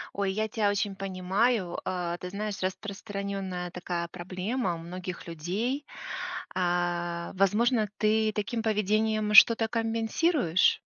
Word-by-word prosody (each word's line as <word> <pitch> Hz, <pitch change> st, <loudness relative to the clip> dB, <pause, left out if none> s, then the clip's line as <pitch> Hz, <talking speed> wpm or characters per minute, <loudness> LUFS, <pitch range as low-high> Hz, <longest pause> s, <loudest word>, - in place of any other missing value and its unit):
Ой, 195 Hz, -1 st, 0 dB
я 215 Hz, +2 st, -1 dB
тя 215 Hz, -1 st, +1 dB
очень 200 Hz, -1 st, -1 dB
понимаю. 190 Hz, +1 st, 0 dB
Э, 175 Hz, -1 st, -2 dB
ты 180 Hz, -, -6 dB
знаешь, 205 Hz, +1 st, -4 dB
распространенная 195 Hz, -2 st, -4 dB
такая 175 Hz, -1 st, -3 dB
проблема 185 Hz, +4 st, -3 dB
у -, -, -7 dB
многих 180 Hz, +2 st, -7 dB
людей. 205 Hz, -, -2 dB, 0.7 s
А, 175 Hz, -1 st, -1 dB
возможно, 210 Hz, +3 st, +2 dB
ты 215 Hz, 0 st, +2 dB
таким 215 Hz, +3 st, -2 dB
поведением 215 Hz, 0 st, +1 dB
что-то 225 Hz, +2 st, +8 dB
компенсируешь? 225 Hz, -, +2 dB
200 Hz, 115 wpm, -28 LUFS, 180-220 Hz, 0.7 s, что-то